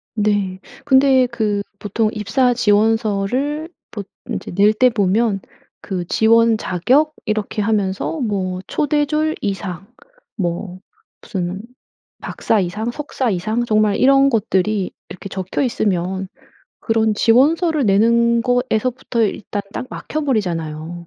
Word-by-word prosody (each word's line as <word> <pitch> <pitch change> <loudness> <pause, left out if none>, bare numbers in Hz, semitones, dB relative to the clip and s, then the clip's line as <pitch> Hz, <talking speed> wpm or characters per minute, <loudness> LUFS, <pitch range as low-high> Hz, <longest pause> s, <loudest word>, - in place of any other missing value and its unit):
네. 205 -3 0 0.3
근데 265 -2 +5
그 215 -4 -1 0.2
보통 215 +2 0
입사 245 +5 +2
지원서를 225 +7 +1 0.2
보 205 - -5 0.3
인제 - - -4
낼 205 +4 +4
때 250 +4 +4
보면 210 -1 +1 0.4
그 180 -3 -4
지원 230 +2 +4
자격 255 - +1
이렇게 215 -1 -2
하면서 205 +6 -1
뭐 190 -6 -2
초급 295 - -1
초대졸 305 +1 +1
이상 195 -2 -4 0.5
뭐 180 -1 -3 0.4
무슨 185 -1 -4 0.6
박사 220 - 0
이상, 210 +6 -2
석사 260 -2 -3
이상 215 +6 -1
정말 215 -2 +2
이런 275 +1 +5
것들이 210 -4 0 0.2
이렇게 185 - -9
적혀 190 +6 -3
있으면 190 -5 -1 0.5
그런 225 -1 +1
지원서를 295 - +3
내는 235 +3 +3
거에서부터 245 -1 0
일단 205 -1 -2
딱 255 - -5
막혀 310 - -5
버리잖아요. 170 - -3
215 Hz, 250 characters per minute, -19 LUFS, 195-245 Hz, 0.6 s, 근데